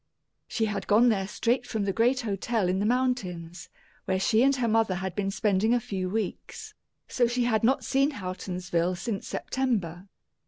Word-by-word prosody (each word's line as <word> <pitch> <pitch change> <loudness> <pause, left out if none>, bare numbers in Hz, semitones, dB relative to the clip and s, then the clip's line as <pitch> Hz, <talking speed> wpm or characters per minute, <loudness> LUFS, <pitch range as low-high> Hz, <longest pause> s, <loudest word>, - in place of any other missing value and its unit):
She 225 - -1
had 205 -3 -3
gone 225 +4 +5
there 195 -4 0
straight 240 +4 0
from 220 -3 -2
the 195 - 0
great 245 +5 +2
hotel 215 -1 -1
in 185 +1 0
the 205 - +1
mountains, 190 -9 -2 0.4
where 190 0 0
she 220 +4 +3
and 275 +2 +4
her 250 -3 0
mother 220 -3 +2
had 190 0 -4
been 200 -1 -1
spending 210 +3 +2
a - - +2
few 190 -5 -4
weeks; 225 - -4 0.3
so 240 -2 +2
she 240 +1 0
had 225 -3 +1
not 260 +4 +3
seen 275 +2 +2
Houghtonsville 180 -3 -2
since 200 0 -4
September. 200 -9 -2
215 Hz, 180 wpm, -27 LUFS, 190-240 Hz, 0.4 s, gone